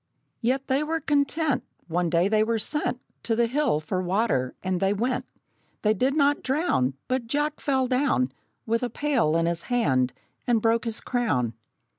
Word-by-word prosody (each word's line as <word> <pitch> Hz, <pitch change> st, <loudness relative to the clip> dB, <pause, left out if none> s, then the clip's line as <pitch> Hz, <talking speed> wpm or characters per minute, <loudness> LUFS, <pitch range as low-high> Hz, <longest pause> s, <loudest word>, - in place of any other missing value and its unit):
Yet 260 Hz, +3 st, 0 dB
they 270 Hz, +1 st, +1 dB
were 320 Hz, +2 st, -1 dB
content. 290 Hz, -1 st, +1 dB, 0.2 s
One 175 Hz, 0 st, 0 dB
day 170 Hz, +2 st, +3 dB
they 215 Hz, +1 st, +3 dB
were 230 Hz, +1 st, 0 dB
sent 255 Hz, +3 st, -1 dB, 0.2 s
To 225 Hz, -, 0 dB
the 235 Hz, +1 st, +3 dB
hill 255 Hz, -, +1 dB
for 185 Hz, +4 st, -2 dB
water, 180 Hz, -, 0 dB
and 185 Hz, -1 st, 0 dB
they 195 Hz, +2 st, +2 dB
went. 245 Hz, +5 st, -1 dB, 0.6 s
They 215 Hz, 0 st, +4 dB
did 260 Hz, +7 st, +1 dB
not 290 Hz, -1 st, +3 dB
drown, 265 Hz, -, +1 dB
But 255 Hz, -2 st, -1 dB
Jack 295 Hz, +4 st, -1 dB
fell 265 Hz, -2 st, +1 dB
down, 250 Hz, -, +1 dB, 0.3 s
With 230 Hz, +1 st, 0 dB
a 245 Hz, -, -1 dB
pail 250 Hz, -, +1 dB
in 165 Hz, -, +1 dB
his 170 Hz, 0 st, 0 dB
hand, 130 Hz, -, +2 dB, 0.3 s
and 235 Hz, -2 st, +3 dB
broke 230 Hz, +2 st, +2 dB
his 225 Hz, -1 st, -2 dB
crown! 145 Hz, -, 0 dB
230 Hz, 175 wpm, -26 LUFS, 185-270 Hz, 0.6 s, They